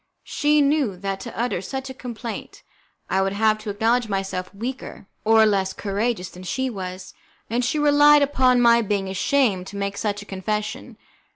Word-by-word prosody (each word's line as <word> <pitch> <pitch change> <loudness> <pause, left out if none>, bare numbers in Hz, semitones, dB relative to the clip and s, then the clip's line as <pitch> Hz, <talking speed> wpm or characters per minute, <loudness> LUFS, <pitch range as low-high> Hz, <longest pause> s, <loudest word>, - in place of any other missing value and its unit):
She 300 0 +2
knew 280 -9 +1
that 195 +1 -3
to 235 +2 -8
utter 240 -7 -1
such 265 +7 -5
a - - -7
complaint 240 -3 -7 0.4
I 190 - +1
would 195 0 0
have 215 +1 +2
to 215 0 -7
acknowledge 225 +3 +1
myself 195 -2 -3
weaker 235 0 -7 0.2
or 220 0 +5
less 195 -3 +1
courageous 205 -1 -2
than 180 - -12
she 260 +8 -2
was, 185 -3 -7 0.4
and 240 +2 +1
she 250 - 0
relied 295 0 +6
upon 255 -3 +3
my 235 0 +5
being 200 -3 -1
ashamed 195 -2 +1
to 200 - -8
make 200 0 -3
such 205 -1 -2
a - - -17
confession. 210 +2 -4
215 Hz, 175 wpm, -23 LUFS, 195-250 Hz, 0.4 s, relied